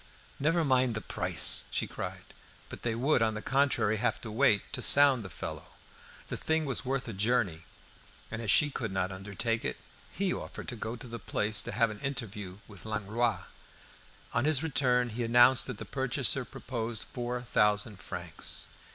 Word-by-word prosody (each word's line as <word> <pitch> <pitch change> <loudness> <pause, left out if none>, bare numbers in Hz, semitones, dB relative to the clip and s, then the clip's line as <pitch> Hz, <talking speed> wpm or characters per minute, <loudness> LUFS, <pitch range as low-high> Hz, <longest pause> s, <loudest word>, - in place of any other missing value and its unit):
"Never 165 +3 +2
mind 130 -3 +2
the 110 - -3
price!" - - +3
she - - -1
cried. - - -6 0.5
But - - -9
they 115 -2 -1
would, 130 +2 +2
on 110 -1 +2
the 105 - -4
contrary, 135 -6 +2
have 120 - 0
to 110 - -6
wait, 105 -1 +3
to - - -3
sound 140 -4 +5
the 95 - -7
fellow. - - -7 0.5
The - - -4
thing 160 0 0
was 135 - -1
worth 130 0 -2
a 115 - -5
journey, 100 -5 0 0.7
and, 110 - -4
as 110 - -4
she 145 +8 +5
could 115 -6 -3
not 95 0 -1
undertake 105 +4 -3
it, - - -2 0.3
he 190 -1 0
offered - - -7
to 125 - -4
go 110 +1 -4
to 125 - -10
the 115 0 -7
place 105 -1 0
to - - -5
have 115 -3 +2
an 105 - -8
interview 105 -9 -5
with 100 -3 -12
Langlois. 110 +2 -1 0.9
On 120 - +1
his 155 -1 +3
return 125 -5 +2
he 120 +2 -3
announced 120 +2 +6
that 125 -5 -5
the - - -7
purchaser 135 0 0
proposed 115 -1 -4
four 125 -2 -4
thousand 105 -3 +2
francs. - - -3
120 Hz, 180 wpm, -30 LUFS, 105-130 Hz, 0.9 s, announced